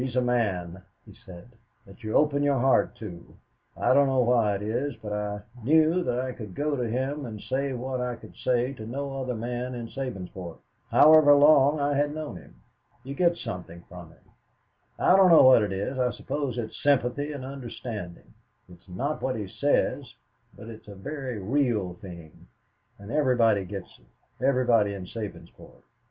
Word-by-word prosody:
"He 130 - -1
is 125 - -8
a 125 - +3
man," 95 -8 -1 0.2
he - - -14
said, 90 +5 -14 0.3
"that 100 +5 -16
you 110 0 -4
open 145 -1 +3
your 145 -1 +2
heart 130 +2 +2
to. 90 -6 -10 0.4
I - - +2
don't 140 +1 +5
know 130 -1 +2
why 115 -4 +2
it 100 - -5
is, 120 +5 -2
but 105 -1 -7
I 105 0 -3 0.2
knew 160 +6 +3
that 125 -6 -1
I 130 0 -2
could 110 -7 -9
go 150 0 -1
to 120 -4 -2
him 135 +5 -2
and 110 -2 -7
say 135 +4 -2
what 130 +1 -4
I 125 -1 -2
could - - -15
say 125 +1 0
to 110 -4 -9
no 135 +2 -4
other 125 -1 -3
man 120 +2 -4
in 120 -1 -6
Sabinsport, 95 -9 -6 0.3
however 155 -1 +7
long 145 0 +5
I 145 0 +1
had 145 +1 0
known 155 - -6
him. - - -16 0.5
You 135 - -6
get 170 +3 +2
something 90 - -7
from 90 -2 -11
him - - -22 0.7
I 180 - +4
don't 190 -1 +6
know 165 - +8
what 130 -3 +7
it 105 -2 -1
is. 100 +7 -3
I 125 -1 +2
suppose 135 0 -4
it's 110 -2 -6
sympathy 140 +1 +1
and 140 -3 -6
understanding. 115 - -8 0.4
It 90 -1 -15
is 95 - -24
not 135 +12 -3
what 130 -1 -1
he 105 -3 -4
says, 145 +9 -1 0.4
but - - -11
it's 110 -2 -11
a 100 - -10
very 130 +3 -6
real 110 -3 0
thing, 85 -8 -12 0.5
and 100 +2 -10
everybody 120 -9 +2
gets 95 0 -9
it, - - -19
everybody 120 -6 +2
in 95 -2 -7
Sabinsport. 105 +1 -10
125 Hz, 185 wpm, -26 LUFS, 105-140 Hz, 0.7 s, know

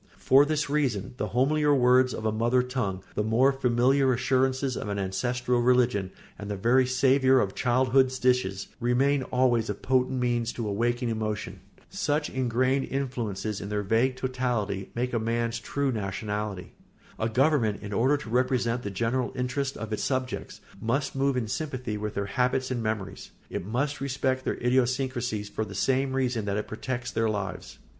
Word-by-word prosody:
For 135 +2 +5
this 150 0 0
reason 135 -10 -1
the 105 - -2
homelier 145 +6 +2
words 125 0 +4
of 110 - -5
a 110 - +2
mother 120 +3 +2
tongue, 120 -8 -3
the - - -1
more 120 +6 +3
familiar 130 +1 +3
assurances 130 +1 +1
of 105 - -4
an 100 - -2
ancestral 120 +6 0
religion, 120 -6 +2 0.3
and 105 0 -6
the 105 - -2
very 125 +6 +3
savour 130 +1 +4
of 100 -5 0
childhood's 130 +1 +2
dishes, 125 -7 0
remain 135 +3 +2
always 125 -3 +1
a 105 - -1
potent 130 +2 0
means 120 -1 0
to 115 -3 -4
awaken 120 +4 0
emotion. 110 -4 -3 0.3
Such 150 -6 -1
ingrained 130 +1 +1
influences, 115 -7 -3
in 100 - -6
their 105 0 -1
vague 115 +6 +2
totality, 125 -7 -2
make 125 +1 -2
a 115 - +1
man's 115 +1 -1
true 140 +3 -1
nationality. 105 -2 -4 0.5
A 110 - 0
government, 125 -4 +2
in 105 0 -5
order 130 +8 +3
to 140 -6 -9
represent 125 -1 +1
the 105 - -4
general 120 +5 -1
interests 130 +2 -2
of 110 -1 -5
its 105 - -2
subjects, 130 -1 -3 0.2
must 135 +5 -1
move 135 -1 +1
in 115 -3 -1
sympathy 125 -2 -3
with 105 0 -4
their 100 - -1
habits 125 +4 0
and 120 -2 -1
memories; 105 -3 -4 0.2
it - - -3
must 140 +5 -1
respect 130 -1 -1
their - - 0
idiosyncrasy 125 -2 0
for 105 +1 -4
the 100 -2 -8
same 130 +5 +1
reason 125 -5 0
that 100 0 -1
it 105 - -3
protects 120 +2 -4
their 110 0 +1
lives. 100 -3 -4
125 Hz, 170 wpm, -27 LUFS, 110-130 Hz, 0.5 s, For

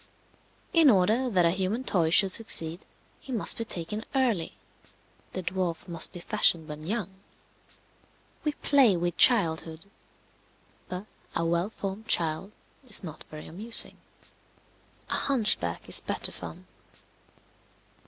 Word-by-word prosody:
In 325 -4 +6
order 220 +5 +2
that 180 -6 +2
a 170 - +3
human 190 +7 -2
toy 170 -9 0
should 190 +3 +5
succeed, 170 -5 +2 0.3
he 265 - -12
must 230 -5 +1
be - - -1
taken 210 +4 -4
early. 235 -11 -1 0.8
The 185 - -4
dwarf 180 -2 -4
must 170 -2 +1
be 175 - -9
fashioned 165 -1 +2
when 150 0 -9
young. 205 -2 -3 1.3
We 300 -2 -1
play 270 -10 +3
with 175 0 -2
childhood. 165 -7 +2 1.0
But 185 +2 -6 0.3
a 165 - -1
well 170 +3 -1
formed 205 0 -7
child 170 0 0 0.3
is 230 -5 +2
not 160 -4 -9
very 155 0 -10
amusing; 215 +8 +3 1.1
a - - +1
hunchback 255 -7 0
is - - +6
better - - +2
fun. - - -10
185 Hz, 125 wpm, -27 LUFS, 170-225 Hz, 1.3 s, In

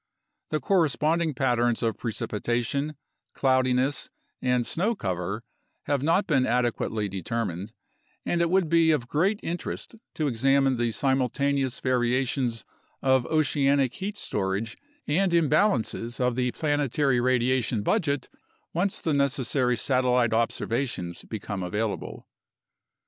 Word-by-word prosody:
The 155 - 0
corresponding 165 -3 +1
patterns 120 -3 +1
of 115 -3 +1
pre 115 - -3
cipitation, 120 +8 -2 0.4
cloudiness, 130 +1 +1 0.3
and 125 -1 +1
snow 205 - 0
cover 95 - -3 0.4
have 140 -2 0
not 165 +7 +2
been 135 -7 +2
adequately 120 -3 0
deter 105 +5 -2
mined, 95 +3 -5 0.5
and 170 - +1
it 170 - +2
would 185 -1 +2
be 165 0 +4
of 145 -7 +1
great 190 +10 +1
interest 175 +6 -4 0.2
to 155 - -1
examine 135 +1 +2
the 120 0 +1
simultaneous 135 +2 0
variations 125 -1 0 0.4
of 130 -2 +3
oceanic 140 -4 +2
heat 205 +2 -5
storage 100 - -2 0.3
and 180 +4 +1
imbalances 150 - +1
of 125 -1 +1
the 125 0 +1
planetary 145 -3 +1
radia 130 0 +2
tion 110 -2 -2
budget, 145 - 0 0.5
once 185 +4 0
the 160 - 0
necessary 135 -3 +1
satellite 125 -2 +2
observations 115 -5 -1
become 105 -2 -5
available. 105 +4 -3
130 Hz, 120 wpm, -26 LUFS, 115-150 Hz, 0.5 s, be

